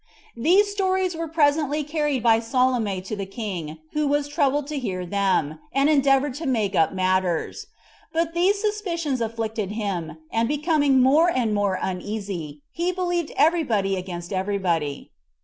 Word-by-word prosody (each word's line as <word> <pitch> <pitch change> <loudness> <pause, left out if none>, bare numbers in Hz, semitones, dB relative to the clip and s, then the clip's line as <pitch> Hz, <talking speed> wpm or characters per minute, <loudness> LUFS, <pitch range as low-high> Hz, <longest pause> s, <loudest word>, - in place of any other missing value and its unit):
These 375 - +3
stories 375 -3 0
were 330 0 -3
presently 300 -1 +2
carried 295 -4 -1
by 225 -1 +5
Salome 230 -5 0
to 195 +3 -5
the 195 -1 -5
king, 190 -7 -5 0.2
who 300 -1 +1
was 290 0 +1
troubled 290 -1 +1
to 300 -2 -2
hear 185 -7 -3
them, 180 -5 0
and 275 +3 +3
endeavored 275 -1 +3
to 320 - -3
make 220 -6 0
up 160 -4 +3
matters; 185 -2 -1 0.4
but 330 0 0
these 375 +4 +2
suspicions 345 - -2
afflicted 225 -2 -3
him, 180 -8 -3
and 230 0 +1
becoming 290 -2 +2
more 305 +7 +5
and 245 -9 0
more 200 -2 +1
uneasy, 185 -6 -5
he 345 +2 -1
believed 350 -3 -2
every 325 +3 +4
body 200 -7 0
against 175 -1 -6
every 195 +2 -1
body. 165 -7 -2
250 Hz, 155 wpm, -24 LUFS, 195-305 Hz, 0.4 s, by